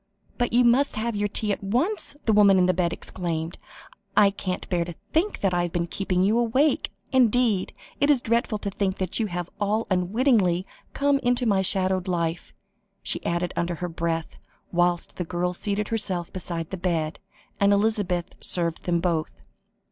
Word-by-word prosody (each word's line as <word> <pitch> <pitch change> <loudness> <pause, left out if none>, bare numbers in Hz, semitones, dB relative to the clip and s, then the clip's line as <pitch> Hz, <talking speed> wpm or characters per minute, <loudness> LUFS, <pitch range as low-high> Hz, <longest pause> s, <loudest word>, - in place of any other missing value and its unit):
but 245 - +1
you 245 +1 +4
must 250 +4 +3
have 230 +1 -2
your 205 0 0
tea 210 +1 -1
at 200 - -3
once," 285 - 0
the 220 - +3
woman 200 -2 +6
in 180 - +4
the 185 - +3
bed 175 -1 0
exclaimed. 170 -2 -3 0.6
"I 200 -1 +6
can't 185 -2 -4
bear 175 -2 0
to 170 -1 -7 0.2
think 350 +7 +1
I 180 -2 +2
have 175 -1 -2
been 170 0 0
keeping 185 +1 -1
you 215 +4 +3
awake; 255 +6 +2 0.2
indeed, 245 -6 +3 0.3
it 285 - +3
is 285 -3 +5
dreadful 235 -1 0
to 200 -1 -4
think 190 -1 -1
that 185 +2 -2
you 220 - +1
have 175 -1 -5
all 210 +2 0
unwittingly 185 -1 +2 0.3
come 280 0 +2
into 245 -1 +1
my 200 -4 +3
shadowed 190 0 +1
life," 170 -2 -2 0.5
she - - -2
added 170 +1 -1
under 175 0 -1
her 180 +2 -4
breath, 165 0 -3 0.3
whilst 175 0 0
the 180 - -1
girl 180 +1 -2
seated 205 +3 -2
herself 190 -6 -1
beside 170 -3 -4
the 190 - -3
bed; 170 -3 -1 0.4
and 200 0 +4
Elizabeth 200 -4 +1
served 170 -2 -2
them 170 -1 +1
both. 165 -3 0
190 Hz, 180 wpm, -25 LUFS, 175-225 Hz, 0.6 s, woman